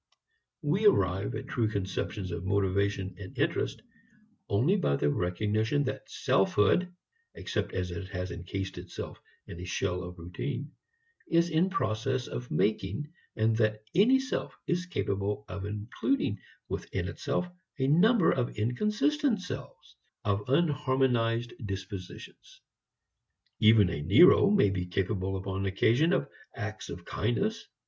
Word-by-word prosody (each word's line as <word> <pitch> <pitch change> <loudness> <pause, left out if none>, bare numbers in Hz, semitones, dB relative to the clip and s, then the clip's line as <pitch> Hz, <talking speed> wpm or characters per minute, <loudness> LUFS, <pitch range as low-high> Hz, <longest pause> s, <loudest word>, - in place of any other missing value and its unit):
We 185 +9 +3
arrive 95 - +2
at - - -5
true 115 -3 0
conceptions 95 -1 -3
of 85 +1 -4
motivation 95 0 0
and 95 -2 -9
interest - - -1 0.7
only 125 - +3
by 125 - +1
the 75 +1 +1
recognition 105 - 0
that 130 - -4
selfhood 105 - +2 0.4
(except - - -3
as 90 -1 -2
it 85 +2 -5
has 90 -2 -4
encased 95 +2 -5
itself - - -8 0.2
in 85 - -9
a - - -6
shell 90 0 -1
of 90 0 -8
routine) 125 - -5 0.6
is 170 0 +3
in 165 +4 +3
process 130 - -1
of 125 0 -6
making, 110 - -1 0.2
and 110 0 +2
that 110 -1 +1
any 240 +9 +5
self 265 -1 -3
is 180 +1 -1
capable 100 - -2
of 95 +1 -5
including 105 - -1 0.3
within - - -3
itself 180 - -2 0.3
a 130 - +1
number 180 - +5
of 125 -4 -1
inconsistent 210 - +1
selves, 65 - -8 0.3
of 100 0 +1
unharmonized 130 -6 +2
dispositions. 95 -2 -8 1.0
Even 110 -3 +6
a 75 - -3
Nero 125 - +7
may 200 - +4
be 90 -2 -2
capable 95 +1 -1
upon 95 0 -3
occasion 120 - +3
of - - +1 0.3
acts - - -5
of - - -7
kindness. - - -1
105 Hz, 130 wpm, -29 LUFS, 95-145 Hz, 1.0 s, Nero